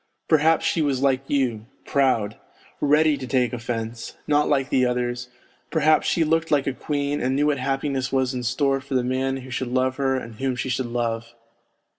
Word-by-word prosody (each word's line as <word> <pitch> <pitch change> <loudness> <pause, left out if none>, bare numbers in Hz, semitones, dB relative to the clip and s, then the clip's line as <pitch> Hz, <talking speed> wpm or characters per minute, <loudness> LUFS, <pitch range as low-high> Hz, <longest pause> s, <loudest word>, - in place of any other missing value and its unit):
Perhaps 160 0 +3
she 165 - +1
was 140 -3 0
like 135 -1 +3
you, 120 -6 0 0.2
proud, 130 -7 +1 0.4
ready 150 +1 +3
to 130 -1 -6
take 125 -1 +1
offence, 115 -1 -4
not 150 0 +2
like 135 -2 +1
the 130 - +3
others; 125 0 -1 0.4
perhaps 155 -1 +3
she 170 - +2
looked 165 +1 +1
like 145 -3 +2
a 135 - -1
queen, 145 +1 -2
and 130 +1 0
knew 145 +2 +2
what 145 -2 +1
happiness 135 0 -1
was 130 -1 +1
in 125 - -3
store 135 +3 0
for 135 0 -5
the 125 - +2
man 130 +1 -1
who 130 - -10
should 130 0 -2
love 130 0 +1
her 135 -1 +1
and 115 -4 -6
whom 135 -1 -1
she 130 - -3
should 125 0 -1
love. 115 -1 -3
130 Hz, 195 wpm, -23 LUFS, 125-145 Hz, 0.4 s, Perhaps